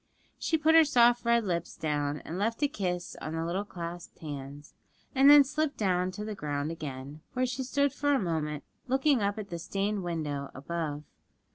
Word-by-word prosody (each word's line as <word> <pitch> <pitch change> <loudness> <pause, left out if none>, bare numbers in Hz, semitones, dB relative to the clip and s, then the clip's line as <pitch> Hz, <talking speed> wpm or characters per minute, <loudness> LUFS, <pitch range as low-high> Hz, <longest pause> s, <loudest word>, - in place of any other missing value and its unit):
She 320 - +1
put 315 +1 +3
her 325 0 +9
soft 240 -4 +4
red 235 -1 +3
lips 170 -3 -2
down 145 -1 -1
and 170 +3 -4
left 230 +7 0
a - - +5
kiss 180 -8 -3
on 155 - -4
the 165 0 -2
little 180 +4 -1
clasped 175 -3 -7
hands, 145 -1 -8 0.4
and 275 0 +6
then 290 -1 +10
slipped 300 +2 -1
down 185 -3 +1
to 210 +2 -5
the 215 - -4
ground 145 -4 -3
again, 145 -1 -7
where 255 0 +1
she 255 +1 -3
stood 280 +1 +1
for 290 0 0
a - - +2
moment 155 -5 -2 0.2
looking 265 0 +3
up 200 +1 0
at 205 -3 -6
the 170 - -4
stained 200 +4 -2
window 150 -5 -3
above. 150 +1 -4
185 Hz, 190 wpm, -29 LUFS, 155-250 Hz, 0.4 s, then